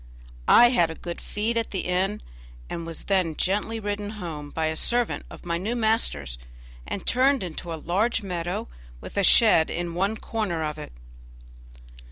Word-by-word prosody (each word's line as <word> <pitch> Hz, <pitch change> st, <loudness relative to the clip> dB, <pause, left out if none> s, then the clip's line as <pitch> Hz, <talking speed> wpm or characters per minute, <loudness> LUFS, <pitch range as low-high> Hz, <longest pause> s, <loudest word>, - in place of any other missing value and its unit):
I 240 Hz, -, +8 dB
had 175 Hz, -9 st, +3 dB
a 160 Hz, -, -6 dB
good 170 Hz, +1 st, -7 dB
feed 220 Hz, +3 st, -2 dB
at 230 Hz, -, -1 dB
the 190 Hz, -, -2 dB
inn, 190 Hz, +3 st, -1 dB, 0.5 s
and 170 Hz, -1 st, -4 dB
was 165 Hz, -, -5 dB
then 185 Hz, -5 st, +1 dB
gently 210 Hz, +6 st, 0 dB
ridden 205 Hz, -1 st, -3 dB
home 155 Hz, -6 st, -6 dB
by 160 Hz, +2 st, -2 dB
a 160 Hz, 0 st, -1 dB
servant 240 Hz, +7 st, +1 dB
of -, -, -12 dB
my 170 Hz, -1 st, -1 dB
new 220 Hz, +6 st, -2 dB
master's, 220 Hz, -, 0 dB, 0.5 s
and 195 Hz, -, -4 dB
turned 260 Hz, -1 st, +3 dB
into 175 Hz, 0 st, -6 dB
a -, -, -2 dB
large 205 Hz, +8 st, 0 dB
meadow 175 Hz, -2 st, -3 dB, 0.3 s
with -, -, -10 dB
a 200 Hz, -, +2 dB
shed 200 Hz, -5 st, +6 dB
in 175 Hz, -1 st, -3 dB
one 195 Hz, +5 st, 0 dB
corner 200 Hz, -10 st, -2 dB
of 155 Hz, 0 st, -4 dB
it. -, -, -8 dB
185 Hz, 175 wpm, -25 LUFS, 165-220 Hz, 0.5 s, I